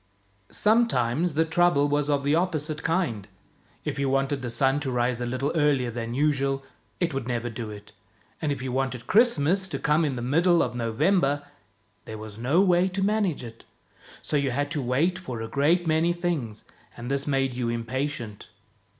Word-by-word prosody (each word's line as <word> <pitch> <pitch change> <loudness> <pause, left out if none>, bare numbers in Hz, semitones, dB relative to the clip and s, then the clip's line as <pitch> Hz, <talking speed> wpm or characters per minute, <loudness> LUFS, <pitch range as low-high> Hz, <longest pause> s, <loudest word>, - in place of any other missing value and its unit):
Sometimes 175 - +2
the 160 +1 +3
trouble 160 -3 +3
was 145 0 0
of 140 -1 +1
the 145 +1 +2
opposite 155 -3 -1
kind. 160 - -1 0.6
If - - -3
you 140 -1 +1
'wanted 135 +1 0
the 125 - -4
sun 135 +4 +2
to 145 -2 -3
rise 125 0 0
a 120 - -2
little 130 +4 -1
earlier 145 -6 +2
than 115 0 -4
usual, 135 -1 +1 0.4
it 170 -4 0
would 135 -3 -3
never 120 -1 -2
do 115 -1 -6
it, 105 -1 -10 0.5
and 155 -2 0
if 140 -2 -3
you 130 - -3
wanted 130 -2 -2
Christmas 190 - +3
to - - -4
come 150 +2 +2
in 145 -4 0
the 120 - -4
middle 170 +7 +3
of - - -3
November, 135 - +1 0.6
there 110 - -7
was 110 0 -9
no 140 +10 +3
way 180 -1 +4
to 190 +1 -2
manage 200 -8 0
it. 115 -1 -10 0.6
So 150 - 0
you 140 -1 +1
had 145 +3 -2
to 145 - -1
wait 145 +9 +1
for 130 -11 -6
a 115 - -4
great 150 +8 +2
many 160 +2 +2
things, 160 -11 -3 0.3
and 120 +2 -6
this 140 +1 -1
made 135 -2 +1
you 120 -1 -2
impatient. 120 -1 -4
140 Hz, 185 wpm, -26 LUFS, 125-165 Hz, 0.6 s, way